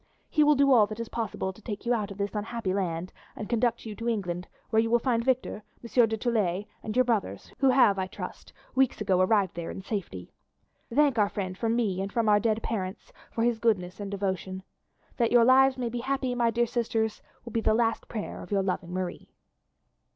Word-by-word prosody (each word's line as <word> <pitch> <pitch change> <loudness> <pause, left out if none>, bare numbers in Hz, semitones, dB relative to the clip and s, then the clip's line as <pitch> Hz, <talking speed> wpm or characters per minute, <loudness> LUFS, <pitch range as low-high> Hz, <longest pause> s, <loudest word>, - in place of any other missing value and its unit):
He 305 - +4
will 295 0 +5
do 275 0 +5
all 220 -4 +6
that 215 +1 -7
is 230 - -4
possible 205 -4 -3
to 215 - -17
take 210 0 -6
you 240 - +2
out 215 -3 -1
of 200 - -9
this 200 0 -2
unhappy 215 -2 -2
land 180 -2 -2 0.2
and 210 - -6
conduct 235 0 0
you 220 - -5
to 230 +1 -2
England, 180 -5 -2 0.2
where 220 -1 +4
you 225 - -1
will 240 - +5
find 235 -1 0
Victor, 255 -4 0 0.2
Monsieur 235 0 +3
du 220 0 -2
Tillet, 210 -5 0 0.2
and 215 - -5
your 255 0 +4
brothers, 230 -4 -2
who 270 - +4
have, 250 -7 +5
I 185 - -1
trust, - - -8 0.2
weeks 265 -1 +2
ago 190 -3 +2
arrived 195 -1 +3
there 170 -1 -5
in 190 - -7
safety. 180 - -5 0.6
Thank 280 -2 +3
our 205 -1 +3
friend 185 -2 -4
from 230 +3 0
me 200 -6 0
and 195 +1 -4
from 230 0 0
our 205 -1 +5
dead 225 0 0
parents 190 -4 -4 0.2
for 230 - -1
his 235 -1 +1
goodness 195 -5 0
and 200 -1 -4
devotion. 190 -1 -3 0.5
That 235 -2 +2
your 240 -1 +6
lives 265 +1 +5
may 245 -2 -2
be 240 +1 -4
happy, 260 0 -1
my 240 -1 +2
dear 235 +1 +2
sisters, 225 -2 -1 0.2
will 235 - -7
be 230 - 0
the 215 - +3
last 225 -1 0
prayer 215 -3 -5
of - - -10
your 200 -1 +2
loving 180 -2 -2
Marie." 185 -1 -4
220 Hz, 220 wpm, -28 LUFS, 195-240 Hz, 0.6 s, all